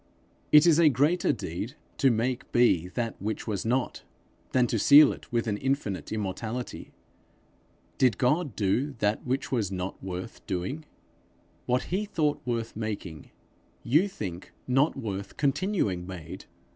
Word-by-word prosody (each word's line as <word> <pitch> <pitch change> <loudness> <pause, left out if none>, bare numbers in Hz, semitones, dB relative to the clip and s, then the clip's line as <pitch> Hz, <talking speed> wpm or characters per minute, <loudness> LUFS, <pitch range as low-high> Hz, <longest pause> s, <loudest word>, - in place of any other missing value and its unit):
It 150 +1 +8
is 165 -2 +5
a 165 -2 +7
greater 150 +7 +2
deed, 100 - -5 0.2
to 135 - +5
make 120 +2 -1
be 120 -9 +3
that 115 +4 -4
which 110 +2 -3
was 105 -4 -2
not, 125 +3 -1 0.5
than 125 -1 +3
to 115 -2 -1
seal 145 +6 +8
it - - -14
with 120 -1 0
an 105 -3 -1
infinite 130 -7 -2
immortality: 110 +4 -4 1.1
did 125 -4 +4
God 140 - +1
do 120 +9 0
that 105 0 0
which 130 +2 -1
was 110 -7 0
not 95 0 -5
worth 95 +4 -6
doing? 100 - -3 0.8
What 125 +1 +1
he 205 +3 0
thought 155 -7 0
worth 115 -2 -3
making, 105 -8 -5 0.5
you 155 +11 +3
think 95 - -7 0.2
not 135 +4 +2
worth 100 -2 -5
continuing 135 - 0
made! 90 0 -8
115 Hz, 145 wpm, -27 LUFS, 100-135 Hz, 1.1 s, It